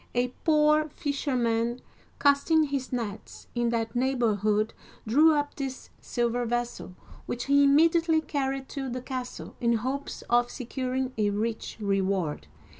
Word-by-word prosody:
A 245 +1 +2
poor 305 0 +4
fisherman, 245 -5 -1 0.4
casting 285 +3 +4
his 275 -3 -3
nets 225 -5 -5
in 240 -1 +1
that 230 -1 -2
neighborhood, 220 -4 +1 0.3
drew 300 +8 +5
up 290 0 -1
this 270 -2 -6
silver 240 0 -1
vessel, 240 -5 -3 0.3
which 240 - -3
he 280 +1 +5
im 280 0 +5
mediately 330 +1 +4
carried 270 -3 -2
to 270 -2 -4
the 250 +1 -4
castle, 255 -2 -6
in 235 -1 +3
hopes 260 +5 -3
of 240 0 +2
securing 255 0 -3
a 210 -1 +3
rich 220 +2 -3
reward. 195 - -1
250 Hz, 135 wpm, -27 LUFS, 230-280 Hz, 0.4 s, drew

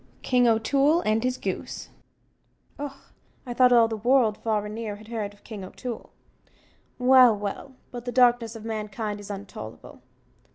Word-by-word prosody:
King 250 -1 +3
O'Toole 275 +8 +3
and 220 -2 +1
His 255 0 0
Goose - - -5 0.9
Och, 280 -1 -8 0.3
I 245 - -4
thought 250 0 +5
all 235 -2 +6
the 225 - -3
world, 235 -1 +3
far 215 -2 -1
and 210 - -6
near, 220 -2 -4
had 215 +2 -14
heerd 215 -3 -3
of 205 - -22
King 210 -4 -8
O'Toole 235 +5 -7 0.9
well, 250 -3 +6
well 205 +6 -5 0.2
but 245 -1 -7
the 245 - -3
darkness 240 -2 +3
of 225 -1 -9
mankind 210 -1 -4
is 205 - -10
untollable! 195 - -9
225 Hz, 160 wpm, -26 LUFS, 210-250 Hz, 0.9 s, all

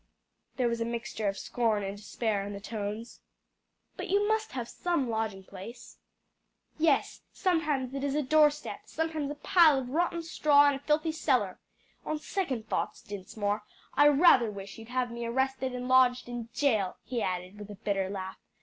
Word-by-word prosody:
There 250 -2 +1
was 235 0 -1
a - - +1
mixture 230 -2 -3
of 195 0 -1
scorn 225 -4 0
and 195 +1 -4
despair 205 0 -2
in 205 +1 -5
the 200 - -6
tones. 215 +2 -5 0.8
"But - - -5
you 405 +2 +3
must 440 0 0
have 245 -3 -3
some 340 -2 -1
lodging 220 -3 -2
place?" 200 +6 -11 0.8
"Yes, 310 -3 +2
sometimes 300 -8 0
it 275 0 -3
is 280 0 0
a 300 - +1
door 300 +2 +6
step, 295 +1 -7
sometimes 315 -3 -2
a 295 - -4
pile 310 -1 +5
of 255 -2 -4
rotten 340 +2 0
straw 290 -3 +5
in - - +1
a 275 - -4
filthy 305 +3 +1
cellar. 250 -12 0 0.4
On 310 - -2
second 280 - -3
thoughts, - - -2
Dinsmore, 205 +1 -3 0.3
I 290 - +6
rather 285 -6 +6
wish 200 0 -8
you'd 225 +1 -11
have 250 -1 -1
me 235 0 -5
arrested 265 +1 -1
and 250 0 -4
lodged 255 -1 +4
in 240 -1 -6
jail," 220 -9 +1
he 245 -2 -3
added 185 +2 -3
with 205 0 -9
a 205 - -7
bitter 195 -2 -1
laugh. 190 -1 -6
245 Hz, 180 wpm, -29 LUFS, 210-295 Hz, 0.8 s, door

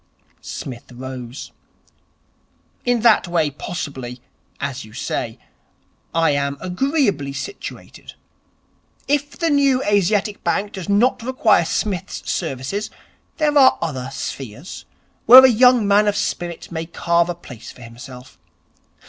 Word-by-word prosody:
Psmith 125 -2 -8
rose. 125 0 -8 1.3
'In 245 -2 +1
that 225 -5 +4
way 165 -4 +1
possibly, 135 -5 -6 0.4
as 140 -1 -4
you 110 - -14
say, - - -4 0.7
I 165 -2 +2
am 140 0 -1
agreeably 190 - 0
situated. 165 +9 -8 0.9
If 290 0 -1
the 335 -2 0
New 275 -2 +3
Asiatic 205 +1 +1
Bank 205 +1 0
does 190 0 -7
not 235 +5 +3
require 230 -7 +2
Psmith's 190 +1 -3
services, 165 +7 -3 0.5
there 300 -1 +1
are 265 -2 +6
other 130 -6 -4
spheres 135 - -7 0.4
where 260 +2 +11
a - - +7
young 245 -2 +5
man 205 +1 +4
of 205 -1 +1
spirit 175 -1 -4
may 165 -1 -4
carve 170 0 +1
a 175 - -2
place 125 -9 -11
for 125 - -14
himself. 125 +2 -12
175 Hz, 125 wpm, -20 LUFS, 140-225 Hz, 1.3 s, where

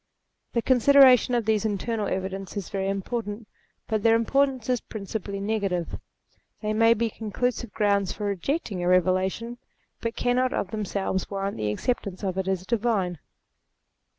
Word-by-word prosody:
The 235 - +1
consideration 260 -1 +6
of 235 -3 0
these 220 -1 +2
internal 215 0 -1
evidences 190 +1 -4
is - - -12
very 195 0 -1
important, 210 +2 -3 0.4
but 220 -2 0
their 225 +1 +5
importance 260 +1 +1
is 250 -2 +1
principally 200 -1 -5
negative; 195 -4 -2 0.6
they 215 -1 -2
may 225 +1 +5
be 230 0 -1
conclusive 235 +2 -2
grounds 200 -2 +1
for 210 - -5
re 200 -1 0
jecting 235 - -2
a - - 0
Eevelation, 185 +6 +1 0.4
but 230 0 -3
cannot 255 +1 +1
of 185 - -2
themselves 195 -3 -2
warrant 195 0 -3
the 105 -1 -1
acceptance 200 - -3
of 190 -2 -1
it 190 - -2
as 190 -1 -1
divine. 205 -7 0
210 Hz, 150 wpm, -26 LUFS, 195-235 Hz, 0.6 s, consideration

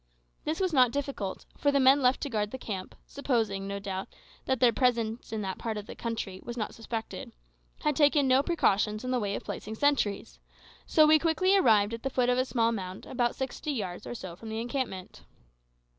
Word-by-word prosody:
This 310 +1 -1
was 370 -3 0
not 255 -3 +6
difficult, 270 -7 -4
for 285 - +2
the 280 - +3
men 270 +2 +6
left 250 0 +3
to 285 - -2
guard 210 -2 0
the 260 - -6
camp, 195 -7 -6
supposing, 225 -8 -1
no 200 0 -3
doubt, 195 -1 -4 0.4
that 260 -2 0
their 240 -1 +5
presence 235 -3 0
in 220 -2 -2
that 190 -1 -4
part 225 -2 -3
of 210 - -6
the - - -8
country 220 -5 -4
was 240 0 -6
not 215 - -3
suspected, 225 -1 -6 0.5
had 300 -1 +2
taken 290 -1 +4
no 260 +1 +5
precautions 215 - +1
in 255 - -2
the 250 - +1
way 200 -2 -1
of - - -5
placing 215 +1 -6
sentries; 210 - 0 0.5
so 310 - +6
we 310 0 +6
quickly 355 +5 +3
arrived 220 - +4
at 230 - -5
the 270 - -2
foot 250 -2 +1
of 250 0 +2
a 255 - +2
small 230 -3 +1
mound 185 -3 -5
about 240 -2 0
sixty 265 +3 -3
yards 195 -6 -4
or - - -5
so 185 -6 -7
from 220 +5 -10
the 220 0 -3
encampment. 235 -6 -4
235 Hz, 210 wpm, -29 LUFS, 210-270 Hz, 0.5 s, not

